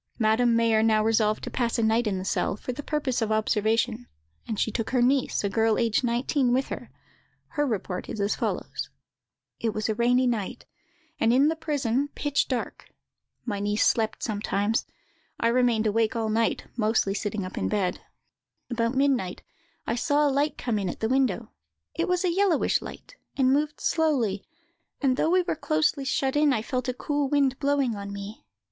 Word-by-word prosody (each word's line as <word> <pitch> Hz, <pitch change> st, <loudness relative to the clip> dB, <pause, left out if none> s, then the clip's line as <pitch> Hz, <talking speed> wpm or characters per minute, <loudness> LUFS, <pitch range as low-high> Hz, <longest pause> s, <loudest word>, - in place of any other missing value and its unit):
Madame 230 Hz, +1 st, +3 dB
Mayer 230 Hz, -1 st, +3 dB
now 220 Hz, -1 st, +3 dB
resolved 215 Hz, -1 st, +2 dB
to -, -, -5 dB
pass 240 Hz, -2 st, 0 dB
a 230 Hz, -, +1 dB
night 220 Hz, +1 st, +2 dB
in 195 Hz, -2 st, 0 dB
the 185 Hz, -, -5 dB
cell, 200 Hz, -, 0 dB
for 250 Hz, -, -5 dB
the 280 Hz, -, -6 dB
purpose 285 Hz, -5 st, -1 dB
of 220 Hz, -1 st, 0 dB
observation; 220 Hz, +2 st, +1 dB, 0.4 s
and 220 Hz, -3 st, -3 dB
she 220 Hz, -, +1 dB
took 225 Hz, 0 st, -3 dB
her 255 Hz, -, +1 dB
niece, 265 Hz, -2 st, +1 dB
a -, -, +1 dB
girl 220 Hz, +2 st, +2 dB
aged 230 Hz, +1 st, +1 dB
nineteen, 245 Hz, +2 st, +1 dB
with 260 Hz, +2 st, +1 dB
her: -, -, -6 dB, 0.6 s
her 295 Hz, -2 st, 0 dB
report 195 Hz, -5 st, -3 dB
is 220 Hz, -, -5 dB
as 200 Hz, +1 st, +1 dB
follows:— -, -, -3 dB, 0.7 s
"It 225 Hz, -2 st, -1 dB
was 215 Hz, +1 st, -1 dB
a -, -, +2 dB
rainy 245 Hz, +3 st, +3 dB
night, 230 Hz, -6 st, -2 dB, 0.5 s
and, 225 Hz, -, +3 dB
in 270 Hz, +5 st, +4 dB
the 325 Hz, -, 0 dB
prison, 285 Hz, -4 st, -1 dB
pitch 290 Hz, -1 st, 0 dB
dark. 255 Hz, -3 st, -4 dB, 0.6 s
My 205 Hz, -4 st, -2 dB
niece 205 Hz, +1 st, +1 dB
slept 220 Hz, -2 st, +1 dB
sometimes; 210 Hz, 0 st, -1 dB, 0.5 s
I 230 Hz, -, +2 dB
remained 235 Hz, -2 st, +2 dB
awake 225 Hz, +2 st, +1 dB
all 225 Hz, -1 st, -1 dB
night, 225 Hz, +1 st, +1 dB
and -, -, -27 dB
mostly 215 Hz, -2 st, +2 dB
sitting 205 Hz, -1 st, -3 dB
up 185 Hz, -, -7 dB
in -, -, -1 dB
bed. 195 Hz, -4 st, 0 dB, 0.7 s
"About 230 Hz, +1 st, 0 dB
midnight 260 Hz, -9 st, +1 dB, 0.4 s
I -, -, -1 dB
saw 290 Hz, +4 st, +2 dB
a 280 Hz, -, +1 dB
light 285 Hz, +2 st, 0 dB
come 230 Hz, -4 st, -1 dB
in 190 Hz, -2 st, -2 dB
at -, -, -6 dB
the 220 Hz, -, 0 dB
window; 265 Hz, 0 st, 0 dB, 0.4 s
it 335 Hz, +3 st, -1 dB
was 360 Hz, 0 st, +1 dB
a 350 Hz, -, +1 dB
yellowish 385 Hz, -4 st, +2 dB
light, -, -, -10 dB, 0.2 s
and 265 Hz, -1 st, +4 dB
moved 300 Hz, +2 st, 0 dB
slowly; 260 Hz, -, +1 dB, 0.6 s
and 265 Hz, -3 st, +2 dB
though 310 Hz, -, +1 dB
we 365 Hz, +1 st, +3 dB
were -, -, -2 dB
closely 310 Hz, -3 st, 0 dB
shut 265 Hz, 0 st, 0 dB
in, 295 Hz, -1 st, +4 dB
I 220 Hz, -3 st, -1 dB
felt 255 Hz, +1 st, -2 dB
a -, -, 0 dB
cool 290 Hz, 0 st, -1 dB
wind 275 Hz, -2 st, +2 dB
blowing 280 Hz, -5 st, +1 dB
on 200 Hz, 0 st, -6 dB
me. 200 Hz, -, -8 dB
235 Hz, 190 wpm, -26 LUFS, 215-275 Hz, 0.7 s, in